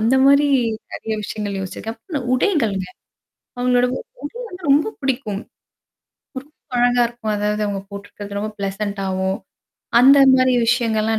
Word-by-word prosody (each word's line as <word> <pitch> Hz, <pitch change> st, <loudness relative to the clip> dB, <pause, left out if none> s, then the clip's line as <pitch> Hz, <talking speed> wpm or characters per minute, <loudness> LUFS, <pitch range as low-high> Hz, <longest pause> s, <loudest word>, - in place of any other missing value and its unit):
அந்த 230 Hz, +4 st, +3 dB
மாரி 280 Hz, +1 st, +5 dB, 0.5 s
நெறைய 220 Hz, -1 st, -4 dB
விஷயங்கள் 205 Hz, -1 st, -4 dB
யோசிச்சிருக்கேன். 220 Hz, +4 st, -6 dB
அப்ப 345 Hz, -6 st, -7 dB
ந 275 Hz, -, 0 dB
உடைகள்ங்க. 230 Hz, -, +1 dB, 0.7 s
அவங்களோட 250 Hz, 0 st, +3 dB
உ -, -, -3 dB
உடை -, -, -47 dB, 0.4 s
வந்து 360 Hz, -1 st, -10 dB
ரொம்ப 310 Hz, +10 st, +3 dB
பிடிக்கும். 245 Hz, -7 st, -2 dB, 1.0 s
ரொம்ப 295 Hz, +3 st, -23 dB, 0.3 s
அழகா 245 Hz, 0 st, +3 dB
இருக்கும். 230 Hz, -2 st, -4 dB
அதாவது 210 Hz, +1 st, 0 dB
அவங்க 195 Hz, -1 st, -3 dB
போட்டுருக்கிறது 200 Hz, 0 st, -7 dB
ரொம்ப 215 Hz, +1 st, -3 dB
பிளசன்ட்டாவும். 195 Hz, -1 st, -2 dB, 0.6 s
அந்த 275 Hz, +3 st, +7 dB, 0.2 s
மாரி 255 Hz, 0 st, +4 dB, 0.2 s
விஷயங்கள்லாம் 225 Hz, -2 st, +1 dB
225 Hz, 135 wpm, -20 LUFS, 200-260 Hz, 1.0 s, அந்த